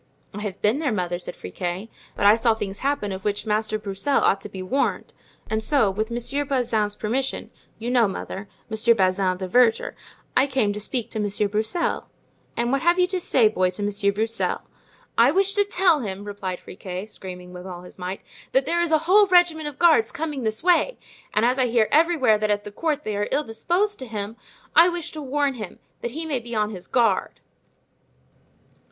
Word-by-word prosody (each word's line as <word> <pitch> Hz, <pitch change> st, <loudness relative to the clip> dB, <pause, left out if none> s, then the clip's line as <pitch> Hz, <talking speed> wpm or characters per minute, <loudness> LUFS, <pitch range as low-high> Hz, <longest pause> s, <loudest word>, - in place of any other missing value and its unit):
"I 205 Hz, -, -6 dB
have 205 Hz, -2 st, -5 dB
been 215 Hz, +7 st, +3 dB
there, 300 Hz, -5 st, 0 dB
mother," 175 Hz, -4 st, -2 dB
said -, -, -7 dB
Friquet, 175 Hz, -, -5 dB, 0.3 s
"but -, -, -1 dB
I 205 Hz, +2 st, +8 dB
saw 230 Hz, 0 st, +2 dB
things 200 Hz, -2 st, -5 dB
happen 275 Hz, -7 st, -1 dB
of 190 Hz, 0 st, -6 dB
which 205 Hz, +1 st, -1 dB
Master 215 Hz, 0 st, 0 dB
Broussel 210 Hz, +7 st, 0 dB
ought 195 Hz, -, +2 dB
to 210 Hz, -, -7 dB
be 190 Hz, -2 st, -7 dB
warned, 265 Hz, +10 st, -1 dB, 0.3 s
and 220 Hz, 0 st, -1 dB
so 245 Hz, -6 st, +3 dB
with 215 Hz, +3 st, -2 dB
Monsieur 240 Hz, +4 st, -1 dB
Bazin's 235 Hz, -7 st, 0 dB
permission—you 240 Hz, 0 st, -4 dB
know, 240 Hz, -3 st, +4 dB
mother, 195 Hz, +1 st, -6 dB, 0.2 s
Monsieur 225 Hz, +1 st, +3 dB
Bazin, 185 Hz, -1 st, +1 dB
the 185 Hz, 0 st, -4 dB
verger—I 250 Hz, +4 st, +1 dB
came 255 Hz, -7 st, +1 dB
to 210 Hz, -, -5 dB
speak 235 Hz, +2 st, -3 dB
to 220 Hz, -, -3 dB
Monsieur 205 Hz, 0 st, 0 dB
Broussel." 220 Hz, -, -1 dB, 0.5 s
"And 240 Hz, +1 st, +1 dB
what 275 Hz, 0 st, +1 dB
hast 345 Hz, +1 st, +3 dB
thou 360 Hz, -, +5 dB
to 370 Hz, 0 st, -2 dB
say, 245 Hz, -9 st, +4 dB
boy, 185 Hz, -4 st, +1 dB
to 185 Hz, +3 st, -4 dB
Monsieur 200 Hz, 0 st, +1 dB
Broussel?" 220 Hz, +3 st, -1 dB, 0.6 s
"I 235 Hz, +2 st, +7 dB
wish 390 Hz, +5 st, +3 dB
to 410 Hz, -, +4 dB
tell 365 Hz, -5 st, +3 dB
him," 200 Hz, -5 st, -5 dB
replied 195 Hz, -3 st, -5 dB
Friquet, 185 Hz, 0 st, -7 dB
screaming 180 Hz, -4 st, -9 dB
with 180 Hz, +1 st, -9 dB
all 180 Hz, -1 st, -8 dB
his 180 Hz, -, -14 dB
might, 185 Hz, +2 st, -5 dB, 0.3 s
"that 265 Hz, 0 st, +3 dB
there 340 Hz, +4 st, +1 dB
is 340 Hz, -1 st, 0 dB
a 315 Hz, 0 st, +2 dB
whole 405 Hz, +3 st, +6 dB
regiment 350 Hz, -4 st, +4 dB
of 290 Hz, -2 st, -7 dB
guards 320 Hz, -10 st, +4 dB
coming 300 Hz, -3 st, -4 dB
this 220 Hz, +1 st, -2 dB
way. 360 Hz, +8 st, +3 dB, 0.3 s
And 215 Hz, -, +2 dB
as 250 Hz, +2 st, +2 dB
I 255 Hz, -, +3 dB
hear 230 Hz, -2 st, +3 dB
everywhere 300 Hz, -9 st, +4 dB
that 215 Hz, 0 st, 0 dB
at 205 Hz, 0 st, +1 dB
the 210 Hz, -, -8 dB
court 300 Hz, +5 st, -1 dB
they 215 Hz, -, -3 dB
are 205 Hz, 0 st, -1 dB
ill 290 Hz, +3 st, +1 dB
disposed 355 Hz, -, -1 dB
to 260 Hz, -, -6 dB
him, 210 Hz, -1 st, -5 dB, 0.4 s
I 340 Hz, +2 st, +8 dB
wish 345 Hz, -2 st, -4 dB
to 310 Hz, -, -7 dB
warn 285 Hz, 0 st, 0 dB
him, 215 Hz, -7 st, -8 dB, 0.2 s
that 240 Hz, -, -2 dB
he 325 Hz, -, -3 dB
may 290 Hz, -5 st, -1 dB
be 235 Hz, 0 st, -7 dB
on 210 Hz, 0 st, 0 dB
his 185 Hz, -3 st, -9 dB
guard." 230 Hz, -6 st, +1 dB
225 Hz, 205 wpm, -24 LUFS, 205-285 Hz, 0.6 s, I